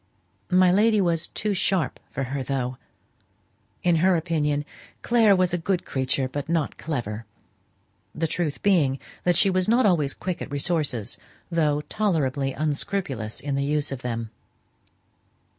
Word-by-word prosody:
My 185 0 +5
lady 215 +3 +4
was 170 -3 +1
too 210 -1 -2
sharp 180 -6 0
for 135 - -3
her, 135 +2 -3
though. 130 -1 -2 1.1
In 175 -2 +4
her 185 +3 +4
opinion 150 -3 0 0.4
"Clare 225 -4 +5
was 185 -1 +2
a 175 - +1
good 180 +1 -1
creature, 130 0 -1
but 145 +3 -5
not 165 -4 -1
clever," 115 -8 -4 0.9
the 165 - 0
truth 160 -2 -2
being 155 -10 +3 0.3
that 175 -1 +4
she 195 - +4
was 185 +1 +1
not 240 +1 +4
always 155 -8 +2
quick 185 -2 -4
at - - -5
resources, 145 - -1 0.3
though 150 -3 +2
tolerably 150 -9 0
unscrupulous 145 - -2
in 145 0 -3
the 140 0 0
use 145 0 0
of 135 -2 -5
them. 115 -3 -4
155 Hz, 145 wpm, -25 LUFS, 135-180 Hz, 1.1 s, My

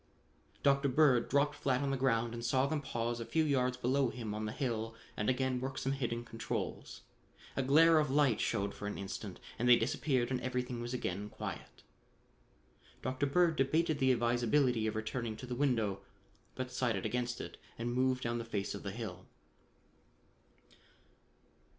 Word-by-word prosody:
Dr. 140 0 +4
Bird 130 -3 +4
dropped 145 +1 +3
flat 135 -2 0
on 140 - 0
the - - +1
ground 120 -3 +1
and 115 0 -5
saw 130 +3 +2
them 150 +1 -1
pause 120 -3 -2
a - - -3
few 160 +6 +1
yards 130 -4 +1
below 130 +1 +2
him 115 -3 -5
on 110 +1 -3
the 105 - -3
hill 115 -4 -2 0.2
and 105 - 0
again 130 0 +1
work 135 0 -4
some 135 - -1
hidden 120 -3 -2
controls. 115 -1 -4 0.5
A - - +1
glare 160 +5 +6
of 150 -2 +1
light 140 -4 +3
showed 100 0 0
for 105 - -6
an 105 - -4
instant 100 0 -6 0.2
and 120 +1 +2
they 120 - +10
disappeared 130 0 0
and 125 -1 0
everything 125 -1 -2
was 120 +1 -3
again 100 -3 -3
quiet. - - -7 1.2
Dr. 130 +2 0
Bird 170 +3 +3
debated 155 +3 +1
the 130 -1 +4
advisability 120 0 +2
of 110 - -2
returning 110 0 -3
to - - -7
the 125 - -4
window 115 -7 +1 0.5
but 130 0 -3
decided 120 -6 -1
against 120 0 -1
it - - -7 0.2
and 120 +1 -2
moved 130 0 +1
down 120 0 -1
the - - -3
face 105 -4 -3
of - - -6
the 100 - -4
hill. 95 -4 -6
125 Hz, 175 wpm, -34 LUFS, 115-135 Hz, 1.2 s, they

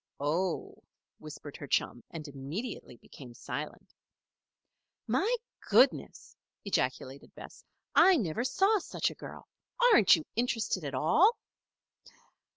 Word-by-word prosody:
"Oh!" 165 +5 -2 0.4
whispered 150 -1 -10
her 145 - -8
chum, 120 -2 -1
and 160 -2 -8
immediately 145 - -7
became 125 -1 -14
silent. 140 +6 -7 1.1
"My 465 +5 +1 0.3
goodness!" - - +2 0.3
ejaculated 135 -7 -3
Bess. - - -12 0.3
"I 375 -2 +6
never 210 - -2
saw 390 - +2
such - - -2
a - - -15
girl. - - -10 0.4
Aren't 215 - +7
you 160 - -6
interested 225 -6 -1
at 140 -2 -4
all?" 340 - +3
160 Hz, 110 wpm, -30 LUFS, -, 1.1 s, Aren't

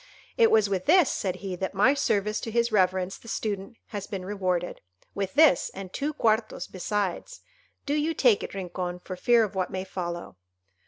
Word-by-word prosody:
"It 460 -1 +5
was 215 -2 +4
with 190 -2 -2
this," 360 -7 +5
said 185 -2 -2
he, 185 -2 -3
"that 190 +2 -4
my 250 +8 +5
service 210 -7 0
to - - -4
his 235 +1 +1
reverence 185 -2 +1
the - - -16
Student 210 -1 -4
has 205 -3 -5
been 190 -3 -5
rewarded—with 185 - -4
this 300 - +5
and 190 -1 -8
two 290 +2 -1
quartos 220 -3 +1
besides. 205 - -3 0.4
Do 285 - -1
you 305 +2 0
take 240 -8 +4
it, - - -6
Rincon, 180 -1 -4
for 185 +1 -7
fear 235 +5 +4
of 210 - -3
what 185 -2 -1
may 185 0 -4
follow." 175 - -6
195 Hz, 180 wpm, -27 LUFS, 185-230 Hz, 0.4 s, It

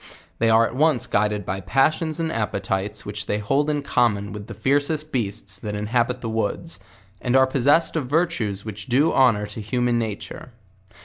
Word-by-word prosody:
They 115 - +3
are 115 +1 +5
at 115 - -5
once 150 -3 +2
guided 105 -1 0
by 95 +1 -3
passions 155 - +1
and 165 -1 -1
appetites, 100 -2 -2
which 105 0 -5
they 105 - 0
hold 135 +8 0
in 145 -1 -1
common 105 -7 +1
with 105 0 -8
the 115 - -8
fiercest 145 +6 0
beasts 105 -4 -3
that 105 0 -5
in 105 0 -3
habit 120 +2 0
the 115 - -4
woods, 110 - -3 0.4
and 125 +1 0
are 130 0 +6
possessed 145 +6 +2
of 150 -6 -1
virtues 125 - 0
which 105 -1 -7
do 135 +6 +3
hon 130 -5 +5
or 105 - -3
to 110 - -7
human 120 +2 0
nature. 110 +2 -6
115 Hz, 190 wpm, -23 LUFS, 105-140 Hz, 0.4 s, are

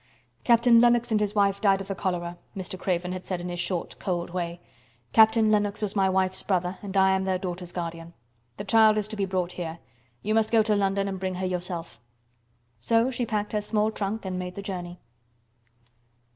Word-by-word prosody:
"Captain 235 -1 +5
Lennox 240 0 +3
and 215 - +3
his 210 0 -1
wife 200 -1 +2
died 195 -2 +4
of 195 - -7
the 195 - -2
cholera," 175 -2 -3 0.2
Mr. 185 0 -5
Craven 180 -1 -2
had 185 0 -5
said 185 -2 -3
in 175 +1 -5
his 175 0 -4
short, 175 0 -2
cold 175 -2 -2
way. 170 -1 -3 0.5
"Captain 220 0 +5
Lennox 210 0 +1
was 210 0 -1
my 195 -1 +3
wife's 185 0 +1
brother 180 -1 -1
and 200 -1 -4
I 190 0 +5
am 190 0 +1
their 190 -1 0
daughter's 180 -1 -6
guardian. 170 -1 -6 0.4
The 200 - -5
child 220 0 +5
is 210 -1 0
to 215 - -5
be 200 -2 0
brought 185 -2 -2
here. 170 -2 -5 0.5
You 215 - 0
must 220 0 +2
go 225 -2 +5
to 215 -1 +2
London 195 0 +1
and 190 -1 -4
bring 185 -1 -3
her 185 +1 -3
yourself." 175 - -4 0.8
So 230 - +2
she 245 -1 -2
packed 210 -1 -2
her 210 - +1
small 215 +1 0
trunk 210 0 -3
and 185 -1 -3
made 180 0 -5
the 200 - -6
journey. 180 -3 -6
190 Hz, 205 wpm, -26 LUFS, 180-210 Hz, 0.8 s, Captain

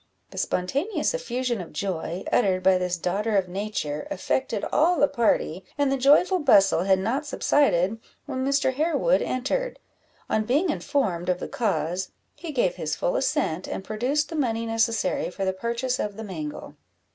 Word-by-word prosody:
The - - -5
spontaneous 280 - -1
effusion 255 - -2
of 170 - -9
joy, 180 -2 -3
uttered 190 -5 +2
by 185 0 +5
this 180 -1 -1
daughter 200 +5 0
of 190 -2 +1
nature, 180 -6 -3
affected 220 +2 -1
all 335 +3 +3
the 290 - +5
party, 210 - 0
and 285 -2 +2
the - - +2
joyful 295 +8 +4
bustle 195 - +4
had 190 -1 +4
not 245 +10 -1
subsided 225 -10 +2 0.3
when 260 -2 -3
Mr. 275 -1 +2
Harewood 330 - +2
entered. 390 - -2 0.5
On 215 - +1
being 295 - +2
informed 205 - -1
of 180 -1 +1
the - - -4
cause, 190 - -1 0.2
he 335 - -7
gave 295 - 0
his - - -2
full - - -1
assent, 260 - 0
and - - -4
produced 250 +9 -1
the 325 - -5
money 230 -6 0
necessary 225 -3 0
for 195 +2 -4
the 190 - 0
purchase 235 +5 -2
of 205 -1 -3
the 220 - -5
mangle. 155 -8 -6
225 Hz, 170 wpm, -25 LUFS, 190-280 Hz, 0.5 s, by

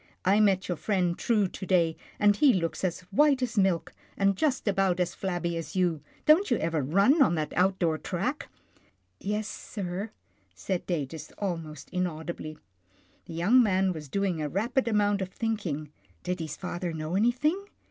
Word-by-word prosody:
" - - -44
I 195 +3 +4
met 195 -3 +3
your 175 - -2
friend 180 -4 0
True 210 -2 +1
to 190 - -7
day, 170 -3 +3 0.2
and 205 0 +4
he 270 +3 +5
looks 165 -1 -2
as 185 -1 -1
white 280 +3 +4
as 240 -2 -2
milk, 180 -4 +1 0.2
and 195 0 +3
just 270 +1 0
about 195 -2 +2
as 180 0 0
flabby 175 -3 -2
as 165 +4 -6
you. 175 -5 +1 0.2
Don't 320 +5 +5
you 240 - +3
ever 160 -1 0
run 195 - +4
on 255 - +5
that 155 -2 -2
out 185 +2 +3
door 160 -4 0
track? - - -3 0.3
" - - -33
" 90 - -45
Yes, 210 +1 -2
sir," 195 0 -5 0.5
said 175 - -3
Datus 160 -3 -3
almost 165 -7 -4
inaudibly. 160 -3 -4 0.7
The 165 - -8
young 205 +10 +5
man 190 -4 +2
was 150 -4 -8
doing 190 -2 -1
a 150 - -2
rapid 240 - 0
amount 205 -2 +2
of 185 - -3
thinking. 185 -9 -3 0.3
Did 180 0 -2
his 160 -2 -5
father 175 -1 -4
know 155 +2 -3
anything? 260 - +1
185 Hz, 180 wpm, -28 LUFS, 165-210 Hz, 0.7 s, he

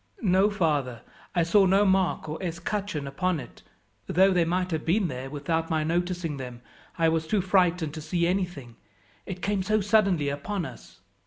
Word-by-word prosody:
"No, 190 +1 +4
father, 145 - -1 0.3
I 170 - +3
saw 190 +4 +4
no 195 +2 +4
mark 190 -4 +1
or 155 +3 -5
escutcheon 180 -1 -3
upon 165 +5 -1
it, - - -11 0.5
though 190 +3 +4
they 175 -2 +3
might 180 +2 -1
have 160 -1 -2
been 185 +2 +1
there 130 0 -5
without 160 +3 -2
my 160 -1 +1
noticing 175 -1 -1
them. 125 -2 -8 0.3
I 165 -1 +3
was 160 0 0
too 210 - +1
frightened 180 -4 +2
to 155 - -6
see 170 +3 0
anything; 175 -10 -2 0.5
it 185 -2 -6
came 200 -1 0
so 215 +3 +1
suddenly 195 -7 +2
upon 170 +6 -3
us." - - -12
175 Hz, 175 wpm, -27 LUFS, 155-190 Hz, 0.5 s, No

